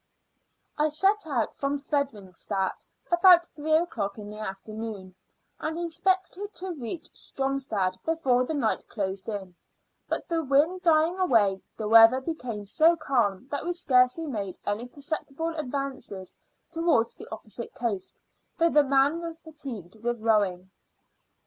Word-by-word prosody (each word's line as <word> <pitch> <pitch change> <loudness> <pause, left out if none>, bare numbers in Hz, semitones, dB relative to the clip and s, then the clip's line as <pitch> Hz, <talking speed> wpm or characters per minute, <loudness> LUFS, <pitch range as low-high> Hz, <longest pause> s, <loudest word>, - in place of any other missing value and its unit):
I 305 +1 +3
set 385 +5 +1
out 245 -7 -1
from 280 +1 -1
Fredericstadt 205 - -3 0.2
about 345 0 +7
three 310 -1 -3
o'clock 230 - 0
in 210 -1 -8
the 210 - -8
afternoon, 215 -1 -6 0.5
and 315 +1 -3
expected 375 +4 -1
to 375 +1 -5
reach 290 +3 -6
Stromstad 265 -9 -1
before 270 -7 +2
the 310 +5 -3
night 240 -6 0
closed 195 -1 -4
in; 195 -4 -5 0.6
but - - -2
the 330 -2 0
wind 300 +7 +2
dying 330 +1 +3
away, 210 - +3 0.2
the 215 - -3
weather 225 +3 +8
became 250 -8 -5
so 320 - +4
calm 245 - 0
that 285 - -2
we 350 - -1
scarcely 260 -2 +3
made 205 - -4
any 210 +4 -2
perceptible 300 +3 -4
advances 275 - -5 0.4
towards 330 -9 +2
the - - -11
opposite 220 +1 -7
coast, 215 -6 -3 0.4
though 335 -1 +3
the 295 - +6
men 280 +4 +3
were 335 -1 -5
fatigued 270 - -8
with 235 +1 -2
rowing. 200 -5 +1
270 Hz, 135 wpm, -27 LUFS, 215-320 Hz, 0.6 s, weather